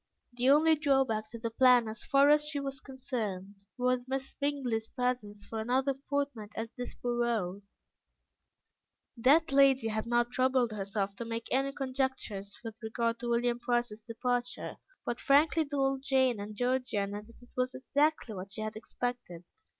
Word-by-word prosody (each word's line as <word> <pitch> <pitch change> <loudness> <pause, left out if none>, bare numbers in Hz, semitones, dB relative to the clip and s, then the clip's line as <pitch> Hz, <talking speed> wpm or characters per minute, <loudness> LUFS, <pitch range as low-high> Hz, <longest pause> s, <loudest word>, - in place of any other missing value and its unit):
The 245 +2 +2
only 310 +3 +6
drawback 270 -8 +1
to 230 - -8
the 230 0 -4
plan, 250 -1 +5
as 220 +1 -5
far 280 +1 +5
as 300 0 +4
she 295 -1 0
was 275 -1 -4
concerned, 205 -8 -5
was 250 0 +1
Miss 265 0 -3
Bingley's 265 -6 -1
presence 245 -5 -2
for 225 - -5
another 260 +5 +1 0.2
fortnight 280 -7 -2
at 225 0 -4
Desborough. 235 -6 -2 1.5
That 275 +6 +4
lady 270 -4 +5
had 220 +1 -2
not 240 0 +2
troubled 255 -2 +2
herself 200 -1 -2
to 235 - -4
make 230 0 -4
any 270 +1 +2
conjectures 260 -7 -3
with 225 0 -8
regard 230 +1 -1
to 240 - -4
William 240 0 +1
Price's 240 -3 -1
departure, 245 +2 -2 0.3
but 240 - -2
frankly 310 +3 +4
told 270 -2 0
Jane 260 -4 +2
and 210 +1 -6
Georgiana 225 -5 -1
that 230 +2 -17
it 245 - -18
was 255 0 -1
exactly 275 0 +1
what 195 0 -7
she 215 - -5
had 215 0 -4
expected. 230 -5 -5
245 Hz, 155 wpm, -31 LUFS, 220-270 Hz, 1.5 s, only